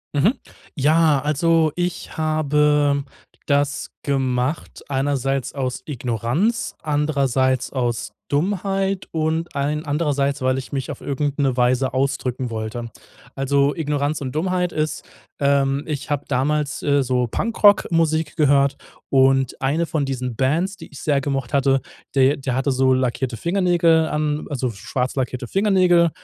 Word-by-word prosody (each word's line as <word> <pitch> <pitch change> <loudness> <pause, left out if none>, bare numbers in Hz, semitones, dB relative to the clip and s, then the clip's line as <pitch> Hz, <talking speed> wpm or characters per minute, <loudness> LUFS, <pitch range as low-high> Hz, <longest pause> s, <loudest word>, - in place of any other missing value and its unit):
Mhm. 195 - +3 0.4
Ja, 150 0 +3
also 155 +2 +2
ich 175 0 -3
habe 150 -2 +2 0.4
das 145 0 0
gemacht 130 +1 -1
einerseits 135 -1 -1
aus 130 -2 -3
Ignoranz, 125 - -1
andererseits 140 -4 +1
aus 120 -5 -2 0.2
Dummheit 195 +4 -1
und 160 +1 -1
allen 150 +3 -1
andererseits, 145 -2 0
weil 130 0 +1
ich 135 - -6
mich 135 -2 -3
auf - - -6
irgend 145 0 -2
'ne 135 -3 +2
Weise 125 +1 +2
ausdrücken 130 -2 -1
wollte. 115 +1 -5 0.5
Also, 140 +1 +1
Ignoranz 145 -2 -1
und 130 -2 -3
Dummheit 180 +2 0
ist, 155 0 -2 0.4
ähm, 140 0 +2
ich 150 -4 -4
habe 145 -1 -1
damals, 145 +2 0
äh, 140 -1 +2
so 125 -1 0
Punkrock-Musik 165 - +2
gehört 140 -2 +3 0.3
und 135 -1 +3
eine 150 +6 +1
von 155 -3 -1
diesen 130 -3 -3
Bands, 165 - 0
die 170 - -11
ich 145 - -10
sehr 140 -2 +1
gemocht 135 -2 -3
hatte, 135 -1 +3 0.3
de 135 +1 +4
der 130 -2 -3
hatte 135 +2 +1
so 130 0 +3
lackierte 130 -1 -1
Fingernägel 170 - +2
an 150 0 -1
also, 130 -3 -2
schwarz 125 +5 -3
lackierte 130 -1 -2
Fingernägel, 185 - +3
140 Hz, 135 wpm, -21 LUFS, 130-155 Hz, 0.5 s, de